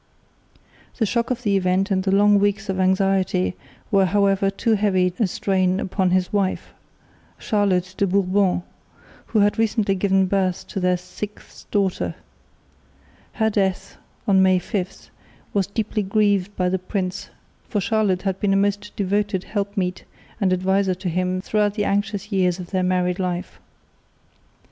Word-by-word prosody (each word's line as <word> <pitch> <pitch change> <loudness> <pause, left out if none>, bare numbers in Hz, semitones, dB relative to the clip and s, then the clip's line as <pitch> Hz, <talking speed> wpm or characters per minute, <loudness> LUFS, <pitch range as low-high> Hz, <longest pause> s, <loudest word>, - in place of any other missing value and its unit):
The 225 - +2
shock 235 +3 -1
of 250 -1 -2
the 205 -3 +2
event 190 +1 +1
and 190 -1 +2
the 190 0 -1
long 205 +1 +5
weeks 205 +1 0
of 190 0 -1
anxiety 190 - +1 0.4
were 195 -2 +4
however 195 +1 +2
too 220 +3 0
heavy 190 -4 +2
a 220 - +3
strain 185 0 0
upon 190 -1 0
his 185 +1 0
wife, 195 -2 -1 0.7
Charlotte 190 -4 0
de 200 - +2
Bourbon, 190 -1 +1 0.6
who 215 - +2
had 205 +2 +2
recently 220 -2 +1
given 195 0 +2
birth 185 -1 0
to 195 - -3
their 180 -1 +2
sixth 190 +4 -10
daughter. 195 -3 0 1.2
Her 220 -1 +1
death, 195 -3 -1 0.3
on 195 -2 +5
May 185 -1 +5
5, 185 0 -5 0.4
was 195 -2 +1
deeply 215 +1 -2
grieved 205 -1 +1
by 180 - 0
the 185 +1 0
prince, 185 0 -4 0.4
for 210 - 0
Charlotte 200 -2 +1
had 195 -1 -2
been 200 -1 +1
a - - +3
most 205 +1 -1
devoted 200 -1 0
helpmeet 200 -3 -3 0.4
and 195 -4 +2
adviser 190 +1 +1
to 180 0 -4
him 185 +2 -1
throughout 210 0 0
the 205 -2 0
anxious 205 +1 -1
years 180 -3 +2
of 180 -2 -9
their 185 -2 +1
married 180 0 0
life. 180 0 -3
195 Hz, 155 wpm, -22 LUFS, 185-205 Hz, 1.2 s, long